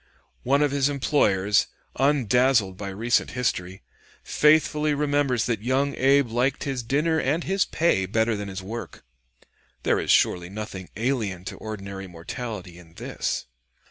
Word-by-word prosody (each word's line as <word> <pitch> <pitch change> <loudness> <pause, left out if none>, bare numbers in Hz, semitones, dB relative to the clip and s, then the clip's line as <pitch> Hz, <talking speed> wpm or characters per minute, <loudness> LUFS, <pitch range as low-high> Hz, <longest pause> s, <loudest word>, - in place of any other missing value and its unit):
One 140 +3 +2
of 145 - +1
his 140 0 +2
employers, 105 -8 +2 0.3
undazzled 125 -6 +2
by 100 +1 -6
recent 115 +5 0
history, 95 -6 -2 0.4
faithfully 150 0 +3
remembers 145 -4 +1
that 115 -4 -1
young 135 +4 +1
Abe 135 0 +3
liked 125 +4 0
his 135 -3 -2
dinner 150 +7 +1
and 155 +5 0
his 195 +1 +1
pay 125 - +1
better 110 +3 +1
than 100 -1 -5
his 95 -1 -6
work: 115 +5 -7 0.8
there - - +2
is - - -4
surely 90 0 +3
nothing 100 -2 -7
alien 110 -6 -2
to - - -6
ordinary 100 -3 -7
mortality 90 +1 -7
in 85 -1 -17
this. - - -3
120 Hz, 140 wpm, -25 LUFS, 100-140 Hz, 0.8 s, faithfully